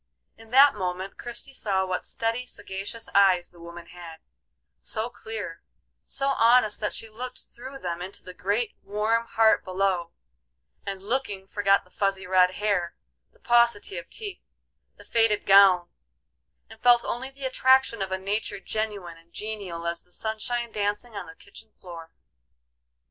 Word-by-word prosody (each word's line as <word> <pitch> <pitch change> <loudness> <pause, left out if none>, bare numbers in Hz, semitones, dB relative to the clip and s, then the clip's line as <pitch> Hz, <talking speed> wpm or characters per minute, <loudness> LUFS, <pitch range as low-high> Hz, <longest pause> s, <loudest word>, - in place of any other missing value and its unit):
In 225 0 -16
that 275 +3 +7
moment 185 -1 -4
Christie 240 +3 -6
saw 195 -6 0
what 185 -1 -3
steady, 230 +2 -2
sagacious 200 +2 -6
eyes 190 -3 +5
the 175 - -19
woman 170 0 -10
had; 170 -2 -11 0.6
so 225 +2 -3
clear, 220 -8 -7 0.4
so 275 0 -1
honest 235 -4 +4
that 210 - -1
she 225 - -6
looked 250 +3 -7
through 260 +3 -9
them 175 -7 -4
into 185 +2 -8
the 185 - -9
great, 205 +5 -1
warm 220 +3 0
heart 220 -1 +4
below, 185 -2 0 0.8
and 195 -1 -4
looking 210 -4 -2
forgot 200 0 +2
the 180 - -25
fuzzy, 195 -1 -1
red 185 0 +4
hair, 200 -5 0 0.4
the - - -27
paucity 235 -6 +2
of 170 - -13
teeth, 410 -4 -7 0.5
the - - -16
faded 225 -2 +2
gown, 195 -3 +7 0.8
and 225 0 -15
felt 240 -1 +5
only 260 +3 -3
the 270 0 -9
attraction 260 -3 +3
of 190 -1 -2
a 190 - 0
nature 205 +1 -2
genuine 200 -6 -4
and 165 +1 -25
genial 200 -6 -5
as 170 0 -2
the 180 - -27
sunshine 225 +4 -3
dancing 210 +2 -2
on - - -5
the 160 - -11
kitchen 215 +4 -14
floor. 165 -3 -10
205 Hz, 155 wpm, -26 LUFS, 185-230 Hz, 0.8 s, that